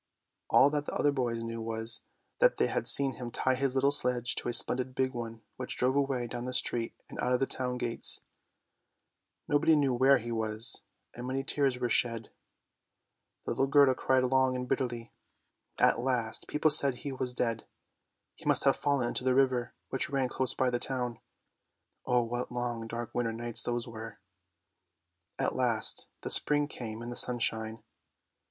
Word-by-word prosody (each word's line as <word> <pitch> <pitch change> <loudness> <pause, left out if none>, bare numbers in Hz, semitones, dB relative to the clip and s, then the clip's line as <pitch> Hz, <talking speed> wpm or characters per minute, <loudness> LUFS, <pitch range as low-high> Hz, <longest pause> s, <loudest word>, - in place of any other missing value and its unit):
All 140 - +5
that 150 -1 -3
the - - -5
other 145 - +1
boys 120 -4 -3
knew 115 0 -6
was, 115 +1 0 0.4
that - - +3
they - - +2
had - - -2
seen 140 -1 +7
him 120 -1 -6
tie 130 +2 -1
his 135 0 -1
little 140 +1 +2
sledge 125 -4 +3
to - - -1
a - - -2
splendid 125 +2 +4
big 130 0 -1
one 115 -2 -7
which 125 - -5
drove 130 +2 0
away 135 -3 -1
down 120 +1 -6
the 125 - -5
street 115 -2 -1
and - - -11
out 125 - 0
of 125 - +1
the 135 - +1
town 125 -1 -4
gates. 120 -1 +5 1.3
Nobody 155 +2 +3
knew 140 -3 +1
where 135 +3 +4
he 120 -1 -7
was, 110 0 +1 0.3
and 120 +1 -8
many 135 +1 -3
tears 135 -2 0
were 125 - -1
shed; 115 -2 -1 1.1
little 135 - -1
Gerda 140 -1 +4
cried 130 0 0
long 130 0 +1
and 125 0 -5
bitterly. 120 -3 -4 0.6
At - - +2
last, 120 -3 -3
people 150 +1 +1
said 140 -3 +4
he 140 +3 -7
was 130 -1 -3
dead; 115 -2 -3 0.7
he - - -17
must - - +3
have - - +2
fallen 140 -4 -1
into - - -1
the 130 0 +1
river 130 -3 0
which 135 - -2
ran 135 -2 -1
close 130 0 -2
by 130 -1 0
the 120 - -2
town. 125 -3 -3 0.9
Oh, 125 -1 +2
what 120 +2 -5
long, 120 -2 -4
dark, 115 0 -7
winter 115 -2 -2
days 120 0 -1
those 120 0 -3
were! 115 -1 -9 1.2
At - - -2
last - - +1
the - - -2
spring 145 0 +4
came 115 -5 -8
and 120 - -7
the - - -6
sunshine. 115 -3 0
125 Hz, 180 wpm, -29 LUFS, 120-135 Hz, 1.3 s, seen